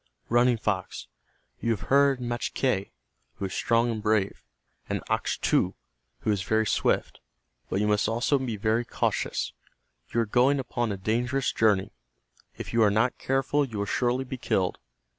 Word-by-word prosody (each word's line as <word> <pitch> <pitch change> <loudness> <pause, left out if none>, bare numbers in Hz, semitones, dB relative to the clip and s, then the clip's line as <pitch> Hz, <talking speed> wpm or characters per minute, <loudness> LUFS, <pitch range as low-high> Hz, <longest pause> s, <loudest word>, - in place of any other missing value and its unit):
"Running 120 0 +4
Fox, 100 -4 -2 0.5
you 115 - -2
have 115 -3 0
heard 140 -1 +5
Machque, 120 -3 -1 0.5
who 100 - -4
is 95 - -5
strong 115 0 +2
and 110 -2 -4
brave, 105 -2 +1 0.5
and - - -2
Achtu, - - +1 0.5
who 110 - +1
is 100 -2 0
very 110 +4 +1
swift, - - 0 0.5
but 95 - 0
you 105 - +1
must 105 +1 +2
also 120 +5 +1
be 125 -4 -3
very 110 +3 +1
cautious. - - -1 0.6
You 115 - +2
are - - 0
going 125 +6 +3
upon 120 -3 -2
a 100 - -3
dangerous 120 +7 0
journey. 105 -4 +2 0.7
If - - -7
you 115 - +3
are 105 - +6
not 110 +5 +1
careful 135 +2 +1
you 120 -6 -5
will 100 - -1
surely 125 +4 0
be 130 0 -6
killed. 95 -6 0
115 Hz, 160 wpm, -27 LUFS, 105-125 Hz, 0.7 s, are